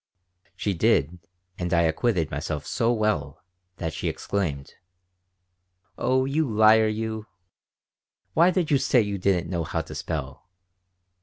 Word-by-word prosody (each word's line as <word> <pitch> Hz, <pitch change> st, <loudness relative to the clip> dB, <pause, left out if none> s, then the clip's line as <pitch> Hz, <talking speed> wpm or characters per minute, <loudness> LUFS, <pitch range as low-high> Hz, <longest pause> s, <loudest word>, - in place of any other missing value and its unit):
She 100 Hz, -, -1 dB
did 85 Hz, 0 st, +1 dB, 0.4 s
and 90 Hz, -1 st, -2 dB
I 85 Hz, -1 st, +4 dB
acquitted 85 Hz, 0 st, 0 dB
myself 75 Hz, 0 st, -4 dB
so 120 Hz, -1 st, +1 dB
well 110 Hz, -2 st, -1 dB, 0.3 s
that 80 Hz, -2 st, -3 dB
she -, -, -2 dB
exclaimed: 80 Hz, -9 st, -3 dB, 1.2 s
"Oh, 130 Hz, +5 st, +1 dB
you 145 Hz, +1 st, 0 dB
liar 110 Hz, +1 st, +5 dB
you! 110 Hz, 0 st, -3 dB, 1.1 s
Why 170 Hz, +3 st, +5 dB
did 180 Hz, -4 st, 0 dB
you 140 Hz, -, +4 dB
say 125 Hz, -2 st, +3 dB
you 100 Hz, -2 st, -3 dB
didn't 90 Hz, -2 st, +1 dB
know 85 Hz, -2 st, -1 dB
how 80 Hz, 0 st, -2 dB
to 80 Hz, -, -10 dB
spell?" -, -, -5 dB
100 Hz, 135 wpm, -25 LUFS, 85-115 Hz, 1.2 s, liar